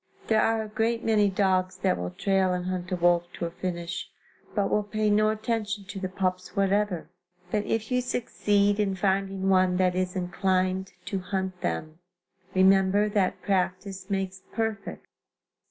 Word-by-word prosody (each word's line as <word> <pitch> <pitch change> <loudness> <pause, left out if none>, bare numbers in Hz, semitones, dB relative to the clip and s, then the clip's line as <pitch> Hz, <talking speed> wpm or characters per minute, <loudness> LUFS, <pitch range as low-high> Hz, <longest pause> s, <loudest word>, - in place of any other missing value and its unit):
There 220 -1 +3
are 225 -1 +2
a - - -7
great 225 +2 0
many 210 -2 +3
dogs 185 -1 +1
that 190 - +1
will 90 0 -3
trail 190 - +1
and 180 0 -2
hunt 185 0 -3
a - - +2
wolf 175 0 +3
to 170 - -3
a 170 - -4
finish, 175 0 -4 0.5
but 205 -2 +2
will 210 - +3
pay 210 0 0
no 215 +1 +4
attention 215 -1 -2
to 195 0 -7
the 185 -1 -3
pups 185 0 -2
whatever; 195 -3 +1 0.4
but 210 -1 0
if 225 +1 -1
you 250 0 +2
succeed 205 -4 +1
in 195 -2 +1
finding 195 0 0
one 185 -1 +4
that 185 -1 +3
is 185 0 -1
inclined 185 +1 0
to 195 -1 -2
hunt 185 0 -3
them, 155 - -3 0.6
remember 195 +2 +4
that 200 -3 0
practice 190 0 -1
makes 190 -1 -2
perfect. 220 -3 -3
190 Hz, 165 wpm, -27 LUFS, 185-210 Hz, 0.6 s, no